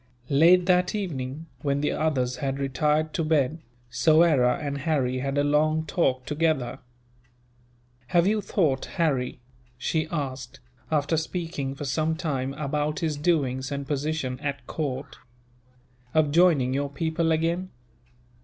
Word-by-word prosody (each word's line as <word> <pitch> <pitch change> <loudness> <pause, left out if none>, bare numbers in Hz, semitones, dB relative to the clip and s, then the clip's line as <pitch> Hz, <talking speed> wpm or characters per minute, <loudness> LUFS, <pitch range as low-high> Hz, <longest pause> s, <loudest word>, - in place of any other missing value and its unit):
Late 170 +5 +6
that 180 +1 +2
evening, 150 -6 -4 0.2
when 140 -2 0
the 150 - +1
others 130 -6 0
had 135 -1 -2
retired 150 +3 0
to 165 - 0
bed, 155 0 +1 0.3
Soyera 155 -5 +4
and 140 -1 -3
Harry 135 -4 0
had 135 +2 -2
a 145 - +3
long 155 +2 +2
talk 130 -6 0
together. 150 -5 0 1.3
"Have 170 +5 +3
you 210 +2 +2
thought, 160 -9 0
Harry," 130 -7 0 0.4
she 155 +5 -1
asked, 135 -5 -5 0.3
after 155 +1 +1
speaking 160 -4 -3
for 145 - -6
some 155 +4 0
time 135 -5 -2
about 150 +2 -2
his 160 -2 0
doings 140 -5 0
and 140 -1 -4
position 145 -3 -2
at 140 -3 -4
court, 140 -2 -4 1.0
"of 155 -2 +3
joining 155 -6 +4
your 140 +1 -1
people 160 +3 -1
again? 170 +3 0
150 Hz, 135 wpm, -26 LUFS, 135-160 Hz, 1.3 s, Late